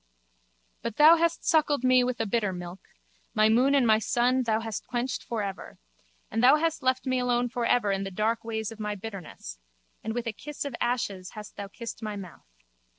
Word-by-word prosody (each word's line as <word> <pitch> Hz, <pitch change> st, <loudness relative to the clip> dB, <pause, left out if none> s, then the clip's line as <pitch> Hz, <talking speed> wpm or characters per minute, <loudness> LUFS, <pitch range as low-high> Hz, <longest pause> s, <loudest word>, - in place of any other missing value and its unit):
But 235 Hz, -, -4 dB
thou 315 Hz, +3 st, +8 dB
hast 335 Hz, 0 st, 0 dB
suckled 300 Hz, -5 st, +3 dB
me 255 Hz, 0 st, +5 dB
with 250 Hz, 0 st, -2 dB
a 225 Hz, -, 0 dB
bitter 210 Hz, -2 st, 0 dB
milk: 180 Hz, 0 st, -7 dB, 0.6 s
my 215 Hz, 0 st, +5 dB
moon 255 Hz, +5 st, +4 dB
and 270 Hz, -3 st, +4 dB
my 220 Hz, -1 st, +5 dB
sun 245 Hz, +4 st, +2 dB
thou 225 Hz, -2 st, 0 dB
hast 225 Hz, -2 st, -5 dB
quenched 245 Hz, +2 st, -2 dB
for 225 Hz, -3 st, -3 dB
ever. 195 Hz, -1 st, -6 dB, 0.5 s
And 225 Hz, -, 0 dB
thou 260 Hz, +4 st, +8 dB
hast 325 Hz, +1 st, 0 dB
left 260 Hz, +1 st, +1 dB
me 255 Hz, -1 st, +1 dB
alone 245 Hz, 0 st, +1 dB
for 240 Hz, -1 st, -1 dB
ever 210 Hz, -5 st, +2 dB
in 195 Hz, 0 st, -1 dB
the 195 Hz, -, -4 dB
dark 215 Hz, +4 st, -1 dB
ways 220 Hz, -1 st, -3 dB
of 225 Hz, -, -11 dB
my 210 Hz, -1 st, -3 dB
bitterness: 185 Hz, -, -8 dB, 0.4 s
and 220 Hz, +1 st, -3 dB
with 240 Hz, 0 st, -2 dB
a 230 Hz, -, -2 dB
kiss 295 Hz, +7 st, -6 dB
of 280 Hz, -4 st, -4 dB
ashes 220 Hz, -7 st, -2 dB
hast 210 Hz, 0 st, -9 dB
thou 200 Hz, -, -6 dB
kissed 230 Hz, +3 st, -8 dB
my 215 Hz, -1 st, -4 dB
mouth. 185 Hz, -, -10 dB
230 Hz, 210 wpm, -27 LUFS, 210-255 Hz, 0.6 s, thou